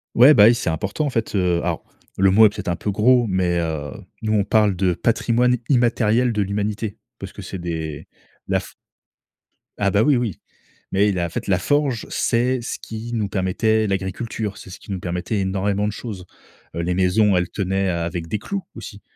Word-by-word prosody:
Ouais, 130 +6 +8
bah 105 -7 +7
oui, 115 +2 +6
c'est 100 - -2
important 95 - -2
en - - 0
fait, 115 -4 -2
heu, 90 -2 +2
alors 85 -1 -2 0.3
le 95 0 +4
mot 110 +3 +7
est - - +6
peut 105 - -10
être 100 - -6
un 85 - 0
peu 95 +5 -4
gros, 120 +4 +3
mais 90 -3 +1
heu 80 -4 -3 0.3
nous 110 0 0
on 105 -2 +3
parle 105 -1 +2
de 90 0 +1
patrimoine 120 +5 +1
immatériel 120 -2 +2
de 105 - 0
l'humanité 105 +1 -2 0.2
parce - - -8
que - - -9
c'est 95 - -7
des 80 -4 -5 0.4
la - - +1
f - - -11 1.1
Ah 100 -1 +2
bah 100 - +3
oui, 145 +4 +4
oui, 115 -7 -2 0.5
mais 100 +2 +3
il 95 -3 -1
a 85 - 0
en - - -9
fait - - -5
la 95 -3 +2
forge, 140 +1 0
c'est 125 +1 +1
ce 115 - -5
qui 115 +1 -7
nous 105 -4 -1
permettait 110 +4 +1
l'agriculture. 100 +2 -3
C'est 95 - -11
ce 90 - -10
qui - - -10
nous 95 - -3
permettait 90 +4 -3
énormément 100 +1 0
de - - -1
choses. 105 -4 -7 0.5
Heu, 85 - -2
les 90 +1 -1
maisons, 95 +2 +3
elles 90 0 0
tenaient, 95 -1 -1
heu, - - 0
avec 85 0 -3
des 105 - -2
clous 200 - -4
aussi. 105 -2 -9
100 Hz, 215 wpm, -21 LUFS, 90-115 Hz, 1.1 s, Ouais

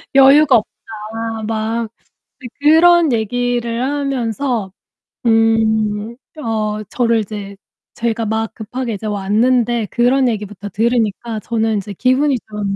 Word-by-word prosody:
"여유가 275 -1 +7
없다." 220 +1 -6
막 225 +1 -2 0.5
그 255 - -7
그런 320 0 +5
얘기를 235 +1 -1
하면서 255 -6 -2 0.5
음 225 -1 +2 0.2
어 215 -4 -2
저를 230 -2 +1
이제 205 -1 -6 0.4
제가 230 -1 -2
막 220 +1 -2
급하게 235 +2 -5
이제 215 +2 -6
왔는데 225 +3 +1
그런 250 +2 +2
얘기부터 210 -3 -4
들으니까 225 0 -1
저는 220 0 -1
이제 200 +1 -5
기분이 260 +6 +2
좀 205 -2 -3
225 Hz, 235 characters per minute, -17 LUFS, 215-245 Hz, 0.5 s, 여유가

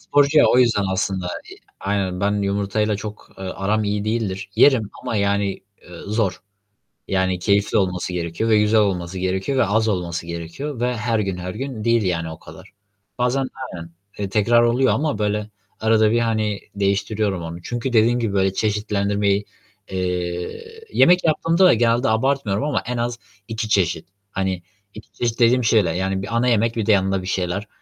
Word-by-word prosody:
Sporcu 145 +1 +3
ya - - +7
o 125 - +4
yüzden 115 -5 +3
aslında, 95 -1 -1 0.2
iii, - - -12 0.2
aynen 95 -2 -1
ben 100 0 +1
yumurtayla 100 +1 0
çok, 105 0 -8
eee, 95 - -6
aram 105 +3 -1
iyi 105 0 -1
değildir. 110 -3 -2
Yerim 125 -8 +4
ama 110 - -2
yani, 100 -1 +1 0.3
eee, 90 -1 -12
zor. 100 -4 -1 0.7
Yani, 95 -1 0
keyifli 100 +4 +2
olması 90 -2 -1
gerekiyor 85 +6 -2
ve 110 -1 +5
güzel 105 +1 +3
olması 95 -3 -1
gerekiyor 95 +8 -1
ve 130 - +4
az 110 +3 +1
olması 90 -4 -2
gerekiyor 85 - -5
ve 125 0 0
her 115 0 0
gün, 95 -3 -2
her 90 +1 -5
gün 130 -3 -5
değil, 115 -1 +3
yani, 85 -3 -1
o 80 - -10
kadar. - - -14 0.5
Bazen 125 +2 +1 0.3
aynen. 85 -1 -8 0.4
Tekrar 115 +3 +3
oluyor 120 +2 +3
ama 150 -6 -1
böyle 105 0 -1 0.3
arada 110 -1 +3
bir, 120 - +2
hani, 110 -3 0 0.2
değiştiriyorum 100 -1 0
onu 85 +1 -7
çünkü 120 +6 -4
dediğim 115 +2 +4
gibi 115 -4 -1
böyle 95 -1 +2
çeşitlendirmeyi 100 -1 0 0.5
Eee, 90 - -4
yemek 180 +1 +5
yaptığımda 165 +3 +3
da 180 - +7
genelde 120 +2 +2
abartmıyorum 115 -2 +1
ama 150 -1 -1
en 125 - -2
az 120 0 -2 0.3
2 110 -1 -4
çeşit. 90 -6 +1 0.2
Hani, 95 -2 -2 0.3
2 110 - -12
çeşit 120 -1 -2
dediğim 120 +2 +4
şeyler. 105 -7 +3
Yani 95 +1 -1
bir 115 +4 -4
ana 120 +2 +2
yemek 115 -1 +2
bir 110 -3 -1
de 110 - +3
yanında 95 -1 +2
bir 95 - -7
şeyler 95 +3 -2
105 Hz, 175 wpm, -21 LUFS, 95-115 Hz, 0.7 s, ya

